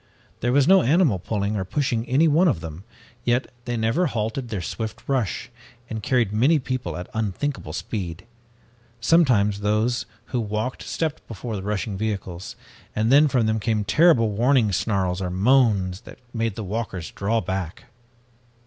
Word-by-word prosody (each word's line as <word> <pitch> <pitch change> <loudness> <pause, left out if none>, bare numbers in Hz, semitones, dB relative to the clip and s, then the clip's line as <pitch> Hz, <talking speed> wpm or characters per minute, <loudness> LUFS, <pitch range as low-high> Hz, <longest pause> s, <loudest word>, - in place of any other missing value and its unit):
There 120 - 0
was 140 +2 +4
no 190 +1 +7
animal 145 - +3
pulling 100 +2 -2
or 95 - -1
pushing 120 +2 -1
any 145 +6 +4
one 160 +5 +4
of 135 - +1
them, 80 +1 -8 0.4
yet 120 +2 0
they 120 -1 -2
never 115 +11 +1
halted 115 +1 -3
their 105 - -3
swift 110 +5 -5
rush, 125 -2 -1 0.4
and 110 -1 -3
carried 120 -2 +1
many 135 +9 +4
people 130 -5 -3
at 90 - -6
unthinkable 110 - -2
speed. 90 +1 -5 0.7
Sometimes 115 -8 +3
those 110 +4 0 0.3
who 125 - +1
walked 110 +4 -3
stepped 160 -2 -3
before 115 -3 -5
the 95 - -4
rushing 100 0 -3
vehicles, 95 -4 -4 0.4
and 110 +2 +1
then 145 +2 +7
from 125 -4 +2
them 110 0 +1
came 110 -1 0
terrible 115 - +4
warning 120 0 +3
snarls 95 -1 0
or 90 - -2
moans 100 -2 +2
that - - -13 0.2
made 115 -3 -1
the 110 - -5
walkers 95 -4 -4
draw 110 +4 0
back. 95 -5 -4
110 Hz, 160 wpm, -24 LUFS, 100-130 Hz, 0.7 s, no